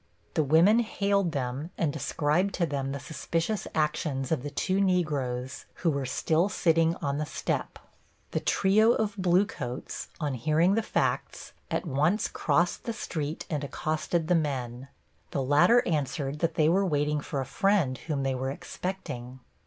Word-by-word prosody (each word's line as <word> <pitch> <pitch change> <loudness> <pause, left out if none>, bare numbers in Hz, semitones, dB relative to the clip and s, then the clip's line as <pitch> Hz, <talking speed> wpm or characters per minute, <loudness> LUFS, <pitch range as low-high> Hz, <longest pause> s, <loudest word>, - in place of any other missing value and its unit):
The - - +2
women 165 - +5
hailed 200 -5 +1
them 135 +2 -3
and 155 -4 0
described 155 +5 0
to 175 - +1
them 135 -3 -2
the 140 - -4
suspicious 165 - -2
actions 150 -3 -1
of 160 - +1
the 145 - -4
two 185 +7 0
Negroes, 140 -9 -1
who 165 - +1
were 140 -2 -2
still 160 +8 +1
sitting 165 -2 +2
on 140 0 -1
the 155 - -1
step. - - -3 0.5
The - - 0
trio 215 +4 +4
of 215 -3 -1
bluecoats, 175 -9 -1
on 150 -4 -1
hearing 155 - +2
the 225 - +2
facts, - - -2 0.2
at - - -1
once 155 +7 +1
crossed 170 +4 0
the 230 - -2
street 155 -6 -4
and 150 -3 -2
accosted 155 +3 -1
the 180 - +3
men. 135 -5 -1 0.4
The 135 - -1
latter 150 - +5
answered 145 -2 -1
that 165 0 0
they 155 -3 +3
were 185 +5 +3
waiting 150 -4 +1
for 140 - -4
a 135 - -2
friend 165 -1 +2
whom 145 -4 -3
they 135 0 0
were 130 +1 -2
expecting. 135 -6 -6
155 Hz, 160 wpm, -28 LUFS, 140-180 Hz, 0.5 s, women